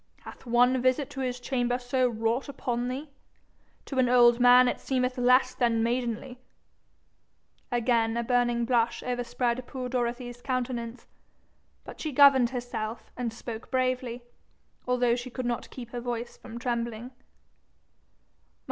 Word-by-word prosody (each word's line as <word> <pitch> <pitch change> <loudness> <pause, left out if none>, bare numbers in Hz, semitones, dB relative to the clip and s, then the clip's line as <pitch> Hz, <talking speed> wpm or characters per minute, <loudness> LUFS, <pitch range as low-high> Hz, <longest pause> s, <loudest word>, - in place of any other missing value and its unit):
Hath - - -12
one 245 +2 +3
visit 255 +2 +1
to 270 - -7
his 250 -1 -2
chamber 245 -1 -1
so 250 0 0
wrought 230 +4 -1
upon 245 -3 -2
thee? 275 +4 -5 0.7
To 270 - -3
an 250 -1 +3
old 240 -1 +6
man 250 +1 +7
it - - -1
seemeth 255 -1 -1
less 250 +1 +4
than 230 -2 +1
maidenly.' 245 +1 -2 1.3
Again 235 -1 +1
a 235 - 0
burning 240 -1 +1
blush 235 -1 +1
overspread 245 0 -1
poor 255 -2 -5
Dorothy's 245 0 -3
countenance. 245 -2 -3 0.8
But - - -10
she 310 - -3
governed 270 -3 +6
herself, 240 -3 -5
and 240 -2 -3
spoke 225 0 -8
bravely, 255 -2 -1 0.6
although 245 -1 +2
she 245 +1 -6
could 255 0 -5
not 240 -1 -3
keep 240 -3 -9
her 245 - -5
voice 240 -1 -4
from 230 - -10
trembling. 235 0 -3
245 Hz, 140 wpm, -28 LUFS, 235-255 Hz, 1.3 s, man